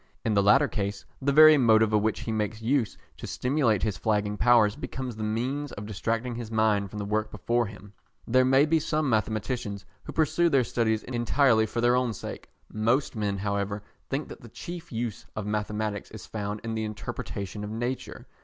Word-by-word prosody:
In 110 Hz, -, +2 dB
the 100 Hz, -, +4 dB
latter 130 Hz, +9 st, +5 dB
case 100 Hz, -4 st, -3 dB, 0.2 s
the 140 Hz, +1 st, +2 dB
very 155 Hz, +1 st, +8 dB
motive 110 Hz, -3 st, +4 dB
of 105 Hz, -, +4 dB
which 110 Hz, 0 st, 0 dB
he 115 Hz, -, -3 dB
makes 105 Hz, 0 st, -2 dB
use 115 Hz, -1 st, 0 dB, 0.2 s
to -, -, -7 dB
stimulate 125 Hz, -7 st, +1 dB
his 105 Hz, -6 st, 0 dB
flagging 105 Hz, +1 st, 0 dB
powers 110 Hz, -2 st, +4 dB
becomes 130 Hz, -3 st, -5 dB
the 110 Hz, -, -7 dB
means 130 Hz, +7 st, -2 dB
of 100 Hz, -, -7 dB
distracting 115 Hz, +4 st, -2 dB
his 115 Hz, -1 st, -6 dB
mind 110 Hz, -3 st, +2 dB
from 105 Hz, -, -8 dB
the 100 Hz, -, -3 dB
work 110 Hz, +1 st, -1 dB
before 120 Hz, -1 st, 0 dB
him. 100 Hz, 0 st, -12 dB, 0.3 s
There 130 Hz, +2 st, +4 dB
may 135 Hz, +2 st, +5 dB
be 160 Hz, +1 st, +2 dB
some 155 Hz, 0 st, 0 dB
mathematicians 110 Hz, -1 st, -1 dB, 0.2 s
who -, -, -6 dB
pursue 165 Hz, +2 st, +2 dB
their 135 Hz, -4 st, +4 dB
studies 110 Hz, -2 st, 0 dB
entirely 120 Hz, -1 st, +2 dB
for 115 Hz, +2 st, -2 dB
their 120 Hz, +1 st, +4 dB
own 125 Hz, -2 st, +1 dB
sake. -, -, -8 dB, 0.2 s
Most 115 Hz, +6 st, +1 dB
men, 105 Hz, -2 st, -1 dB
however, 100 Hz, +1 st, -2 dB, 0.3 s
think 140 Hz, +3 st, -2 dB
that -, -, -10 dB
the 115 Hz, -, -12 dB
chief 175 Hz, +8 st, -8 dB
use 115 Hz, 0 st, -4 dB
of 105 Hz, -, -4 dB
mathematics 105 Hz, 0 st, -2 dB
is 110 Hz, -3 st, -10 dB
found 105 Hz, -1 st, -4 dB
in 115 Hz, 0 st, -3 dB
the 110 Hz, 0 st, -2 dB
interpretation 105 Hz, -1 st, -5 dB
of 105 Hz, -, -5 dB
nature. 120 Hz, +4 st, -4 dB
110 Hz, 195 wpm, -27 LUFS, 105-125 Hz, 0.3 s, very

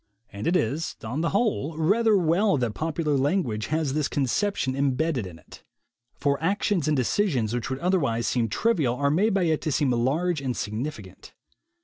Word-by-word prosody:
And 100 Hz, +9 st, -4 dB
it 175 Hz, -, +2 dB
is, 150 Hz, +2 st, -1 dB
on 125 Hz, +8 st, -3 dB
the 165 Hz, -, +1 dB
whole, 195 Hz, -, 0 dB
rather 210 Hz, +6 st, +3 dB
well 180 Hz, +2 st, +2 dB
that 120 Hz, -4 st, -1 dB
popular 155 Hz, 0 st, -1 dB
language 135 Hz, -, 0 dB
has 155 Hz, -2 st, -1 dB
this 150 Hz, -1 st, 0 dB
conception 135 Hz, -, -1 dB
imbedded 140 Hz, -, 0 dB
in 85 Hz, -3 st, -11 dB
it. -, -, -16 dB, 0.5 s
For 140 Hz, 0 st, 0 dB
actions 185 Hz, -2 st, 0 dB
and 150 Hz, -2 st, +2 dB
decisions 125 Hz, -, 0 dB
which 120 Hz, +1 st, -2 dB
would 130 Hz, -, -2 dB
otherwise 140 Hz, -9 st, 0 dB
seem 115 Hz, -3 st, 0 dB
trivial 150 Hz, -, +1 dB
are 140 Hz, +2 st, +1 dB
made 200 Hz, +7 st, +2 dB
by 195 Hz, -, +2 dB
it 160 Hz, -2 st, +1 dB
to 155 Hz, -, -2 dB
seem 140 Hz, -1 st, +1 dB
large 145 Hz, +7 st, 0 dB
and 130 Hz, -3 st, -3 dB
significant. 115 Hz, +9 st, -6 dB
150 Hz, 180 wpm, -25 LUFS, 125-175 Hz, 0.5 s, rather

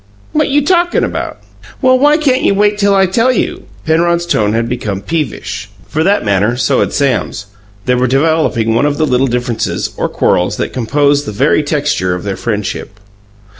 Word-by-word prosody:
"What 305 Hz, 0 st, +1 dB
you 285 Hz, +1 st, +2 dB
talkin' 350 Hz, 0 st, +2 dB
about?" -, -, -4 dB, 0.4 s
"Well, 255 Hz, -1 st, +3 dB
why 295 Hz, +2 st, +4 dB
can't 275 Hz, -4 st, +1 dB
you 200 Hz, -, +2 dB
wait 205 Hz, +1 st, +2 dB
till 200 Hz, -1 st, +3 dB
I 195 Hz, 0 st, +4 dB
tell 230 Hz, +7 st, +2 dB
you?" 250 Hz, -, -2 dB, 0.2 s
Penrod's 170 Hz, +2 st, +1 dB
tone 105 Hz, -11 st, +1 dB
had 115 Hz, +1 st, 0 dB
become 110 Hz, -5 st, -3 dB
peevish. 145 Hz, -6 st, -4 dB, 0.2 s
For 155 Hz, -, -1 dB
that 200 Hz, -, +1 dB
matter, 105 Hz, +4 st, +1 dB
so -, -, +1 dB
had -, -, 0 dB
Sam's; 130 Hz, -6 st, -1 dB, 0.4 s
they 125 Hz, -, +2 dB
were 125 Hz, +1 st, +1 dB
developing 135 Hz, -5 st, +1 dB
one 120 Hz, +6 st, +2 dB
of 145 Hz, 0 st, -1 dB
the 155 Hz, -, +2 dB
little 130 Hz, -1 st, +1 dB
differences, 120 Hz, -2 st, -2 dB
or -, -, -1 dB
quarrels, -, -, 0 dB
that -, -, -3 dB
composed 145 Hz, +4 st, +1 dB
the -, -, -3 dB
very 135 Hz, +8 st, +2 dB
texture 145 Hz, -, -1 dB
of 90 Hz, -, -6 dB
their 100 Hz, -2 st, -3 dB
friendship. 105 Hz, -2 st, -4 dB
145 Hz, 185 wpm, -14 LUFS, 115-195 Hz, 0.4 s, why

